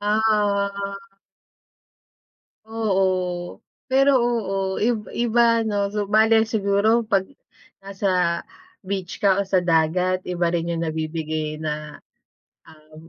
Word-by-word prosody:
Ah. 205 -2 0 1.7
Oo, 190 -5 -1 0.3
pero 270 +1 +4
oo 195 -6 -1
ib 220 -1 0
iba 235 0 +3
'no, 205 -1 -1
so 205 -1 -2
bale 220 +1 +4
siguro 220 +2 +2
'pag 195 -3 0 0.6
nasa 185 -3 0 0.5
beach 190 -1 -4
ka 200 -1 +3
o - - -6
sa 190 -1 +1
dagat 180 +2 +1
iba 175 -1 -1
rin 170 0 -1
yung 165 0 -2
nabibigay 155 -1 -3
na, 150 -1 -5 0.7
um, 155 0 -16
195 Hz, 105 wpm, -22 LUFS, 170-215 Hz, 1.7 s, pero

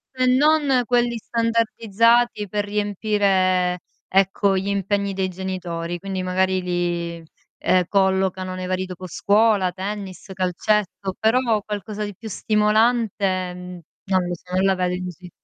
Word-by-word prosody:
E 255 0 +1
non 275 0 +4
quelli 240 -1 +1
standardizzati 230 0 +1
per 205 +2 -2
riempire, 200 -3 +1 0.3
ecco, 195 +1 +2
gli 190 +1 -2
impegni 200 0 0
dei 190 -1 -1
genitori, 175 -2 -4
quindi 190 -1 -4
magari 185 +1 +1
li, 175 -2 -2 0.4
ehm, 185 0 +3
collocano 190 -1 +1
nei 185 0 -5
vari 185 0 -1
dopo 185 0 -8
scuola, 205 +1 +2
tennis, 195 0 -6
calcetto, 190 +1 -1
però 225 -1 +2
qualcosa 210 +1 -5
di 205 -1 -5
più 220 +4 -9
stimolante, 210 -3 +1
mhmm, 180 0 -9 0.3
non 190 -2 +2
lo 175 - -2
so 180 +2 -8
non 190 - +2
la 195 0 +3
vedo 180 -1 0
così 180 0 -9
195 Hz, 135 wpm, -22 LUFS, 185-215 Hz, 0.4 s, non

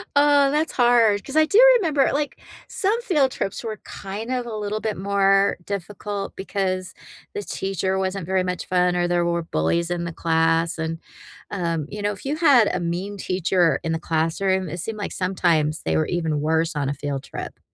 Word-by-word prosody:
Oh, 285 -1 +5
that's 305 +2 0
hard, 235 -5 +4
'cause 275 - -8
I 310 - +6
do 405 +8 +3 0.2
remember, 305 - +2
like, 290 +1 -2 0.3
some 420 +3 0
field 295 - +2
trips 195 - -4
were 220 -2 -4
kind 210 +5 -6
of 250 -1 -2
a 225 - -5
little 210 0 -3
bit 215 -2 -2
more 195 +1 +3
difficult 200 +1 -5
because 185 -1 -2 0.4
the 415 -1 -4
teacher 190 - -2
wasn't 190 -1 -2
very 190 +1 +1
much 180 -1 -3
fun, 180 -1 +2
or 175 0 +1
there 175 0 +1
were 170 0 0
bullies 165 - 0
in 175 -1 -2
the 170 - -4
class, 165 +1 +1
and, 160 0 -3 0.5
um, 170 -5 -2
you 210 0 -6
know, 205 - 0
if 205 - -10
you 285 +2 -1
had 275 -9 +5
a - - -1
mean 180 +4 -3
teacher 180 -2 +1
in 165 - -2
the 160 - -2
classroom, 175 +4 0
it 175 +4 -5
seemed 220 +6 -4
like, 205 - -4
sometimes, 170 -4 0
they - - 0
were 155 - +1
even 160 -4 -1
worse 160 +2 0
on 140 -2 -1
a - - -1
field 140 -1 -4
trip. - - -8
190 Hz, 195 wpm, -23 LUFS, 170-215 Hz, 0.5 s, I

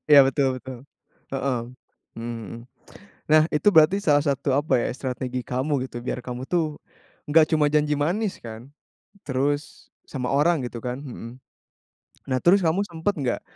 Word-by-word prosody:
Iya, 145 - +10
betul 135 -1 +1
betul. 130 -1 -9 0.5
Heeh. 135 -2 -1 0.6
Mmm, 115 0 -5
hmm. 115 +5 -9 0.6
Nah, 155 0 +6
itu 150 +7 +2
berarti 160 +5 +6
salah 145 -7 +3
satu 140 -2 0
apa 145 -2 +2
ya, - - 0
strategi 130 -1 -4
kamu 130 +2 -1
gitu 120 - -7
biar 125 - -3
kamu 125 +1 -6
tuh 155 -3 -1 0.5
nggak 155 +1 +4
cuma 150 -1 +3
janji 150 0 +2
manis 185 +8 -1
kan? 115 +3 -10 0.5
Terus 145 +2 -2 0.2
sama 130 -3 -4
orang 150 -1 +2
gitu 120 -1 -6
kan? 125 +1 -3
Hmm. 125 -4 -8 1.0
Nah, 130 - +1
terus 190 +3 +5
kamu 180 +4 +1
sempat 170 +3 -2
nggak 130 -5 -1
140 Hz, 155 wpm, -24 LUFS, 125-155 Hz, 1.0 s, Iya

